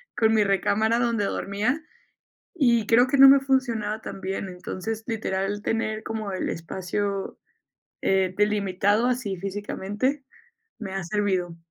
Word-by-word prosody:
con 220 -1 +3
mi 215 - +4
recámara 205 +3 +1
donde 235 -3 +1
dormía, 215 +10 -1 0.7
y 240 - +3
creo 240 +3 +5
que 280 - +1
no 270 0 +10
me 275 +1 +7
funcionaba 235 -6 0
tan 195 - -8
bien. 190 0 -3
Entonces, 185 +4 -5
literal, 205 -3 -2
tener 220 -1 -1
como 215 -3 -4
el 185 - -2
espacio, 190 +4 -3 0.6
eh, 190 -1 +1
delimitado 205 +1 +2
así 240 -6 -1
físicamente 205 +7 -3 0.6
me 195 -4 -6
ha 195 -1 -3
servido. 185 -2 -1
210 Hz, 135 wpm, -25 LUFS, 195-230 Hz, 0.7 s, no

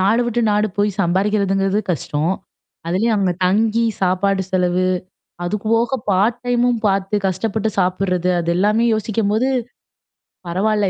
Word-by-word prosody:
நாடு 210 +6 +3
விட்டு 240 0 0
நாடு 210 +1 +2
போய் 205 0 +2
சம்பாரிக்கிறதுங்கிறது 195 +2 +1
கஷ்டம். 160 +1 -1 0.5
அதிலயும் 210 +7 +1
அங்க 190 -3 +1
தங்கி 220 +4 +2 0.2
சாப்பாடு 190 +1 +1
செலவு. 180 -1 +1 0.6
அதுக்கு 210 +4 -3
போக 240 +3 +1
பார்ட் 205 +5 +2
டைமும் 245 -1 +2
பார்த்து 195 +1 0
கஷ்டப்பட்டு 215 +3 -1
சாப்புட்றது, 180 -1 +1
அது 170 0 -1
எல்லாமே 210 +5 +2
யோசிக்கும்போது 220 +3 0 1.0
பரவால்ல. 205 +3 +1
200 Hz, 120 wpm, -19 LUFS, 185-220 Hz, 1.0 s, நாடு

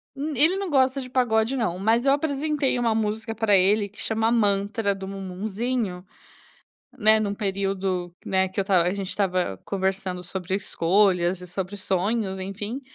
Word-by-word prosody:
Hum, 295 +3 -3
ele 325 +9 +3
não 395 -2 -3
gosta 265 -2 +3
de 255 - -7
pagode 240 -1 +1
não, 215 -9 -1
mas 225 +5 +2
eu 275 - +5
apresentei 285 -2 0
uma 230 -2 +1
música 220 +1 -2
pra 220 -2 +3
ele 200 +2 +3
que 205 - -13
chama 225 +1 +1
Mantra 205 -1 +1
do 190 0 -7
Mumuzinho, 195 +1 -3 0.9
né, 220 -1 +5
num 205 -2 -1
período 195 -3 -2
que - - -11
né, 190 0 +2
que 190 +2 -3
eu - - +2
estava 190 -3 +3
a 180 - +1
gente 195 -2 -4
estava 185 - -1
conversando 190 -2 -2
sobre 180 +1 -4
escolhas 185 -1 +2
e 180 - -9
sobre 190 +2 -5
sonhos 195 +1 -1
enfim, 205 +6 -5
200 Hz, 170 wpm, -25 LUFS, 190-230 Hz, 0.9 s, eu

